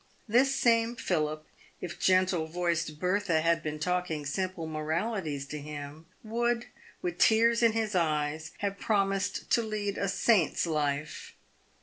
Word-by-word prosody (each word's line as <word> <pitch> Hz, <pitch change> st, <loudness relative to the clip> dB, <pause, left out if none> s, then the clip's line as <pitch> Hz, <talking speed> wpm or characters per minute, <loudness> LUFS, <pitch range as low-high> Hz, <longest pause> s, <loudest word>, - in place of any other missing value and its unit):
This 260 Hz, +5 st, +3 dB
same 230 Hz, -1 st, +3 dB
Philip, 155 Hz, -7 st, -1 dB, 0.3 s
if 175 Hz, -1 st, -7 dB
gentle 185 Hz, -3 st, +3 dB
voiced 170 Hz, -2 st, -1 dB
Bertha 180 Hz, -2 st, +1 dB
had 165 Hz, 0 st, +2 dB
been 155 Hz, 0 st, -4 dB
talking 165 Hz, -2 st, -1 dB
simple 185 Hz, +3 st, -2 dB
moralities 160 Hz, 0 st, -2 dB
to 150 Hz, -, -5 dB
him, 150 Hz, +2 st, -8 dB, 0.2 s
would, 235 Hz, +2 st, 0 dB, 0.4 s
with 355 Hz, -2 st, -3 dB
tears 230 Hz, +1 st, +4 dB
in 230 Hz, -2 st, +4 dB
his 220 Hz, -1 st, -1 dB
eyes, 155 Hz, -2 st, 0 dB, 0.2 s
have 200 Hz, 0 st, -3 dB
promised 195 Hz, -2 st, 0 dB
to 235 Hz, -, +4 dB
lead 210 Hz, -2 st, -3 dB
a 200 Hz, -, 0 dB
saint's 195 Hz, -4 st, +2 dB
life. 150 Hz, -2 st, -2 dB
180 Hz, 135 wpm, -29 LUFS, 155-215 Hz, 0.4 s, tears